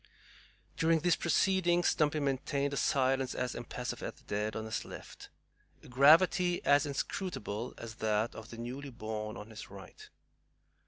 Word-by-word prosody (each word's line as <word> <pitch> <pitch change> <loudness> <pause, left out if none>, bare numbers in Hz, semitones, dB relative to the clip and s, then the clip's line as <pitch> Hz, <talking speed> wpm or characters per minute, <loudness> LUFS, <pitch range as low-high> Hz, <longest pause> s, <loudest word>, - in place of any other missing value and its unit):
During 165 -1 +3
these 175 0 +3
proceedings 175 0 +2
Stumpy 150 0 +1
maintained 140 0 -1
a - - -1
silence 135 -1 +1
as 125 -1 -2
impassive 120 +1 -5
as - - -5
the - - -22
dead 105 +1 -2
on 110 - -3
his 110 - -3
left, - - -10 0.5
a - - -13
gravity 170 +7 +5
as 145 +1 +4
inscrutable 135 - -4
as 115 -1 -7
that 110 +1 0
of 110 0 -10
the 115 - -9
newly 130 +4 -6
born 110 -3 -5
on 105 +2 -9
his 110 - -9
right. 100 -1 -12
130 Hz, 155 wpm, -32 LUFS, 110-155 Hz, 0.5 s, gravity